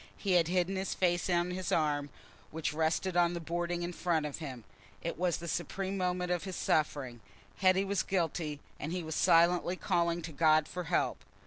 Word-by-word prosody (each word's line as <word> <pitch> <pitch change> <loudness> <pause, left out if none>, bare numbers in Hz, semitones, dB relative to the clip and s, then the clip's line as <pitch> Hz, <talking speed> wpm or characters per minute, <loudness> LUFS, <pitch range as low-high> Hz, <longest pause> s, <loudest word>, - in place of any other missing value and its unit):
He 200 - -2
had 175 -3 +4
hidden 185 +2 +1
his 190 0 -2
face 175 0 +1
on 175 0 +1
his 185 -1 -3
arm, 145 -2 +1 0.4
which 155 -2 -3
rested 160 +4 0
on 175 0 +3
the - - -3
boarding 175 +1 -2
in 175 +1 -3
front 165 -3 0
of 150 0 -5
him. 130 -7 -7 0.4
It 170 - -2
was 175 -2 0
the 170 - -7
supreme 190 +4 -2
moment 180 -1 -1
of 175 -1 0
his 190 -2 -5
suffering: 145 -7 0 0.4
Hetty 190 0 +4
was 200 0 0
guilty; 165 -5 -2 0.2
and 155 - -4
he 180 0 -2
was 160 0 -4
silently 170 +3 +4
calling 170 -2 0
to 160 - -5
God 155 0 +4
for 180 -1 -5
help. 170 +1 0
175 Hz, 195 wpm, -32 LUFS, 160-180 Hz, 0.4 s, had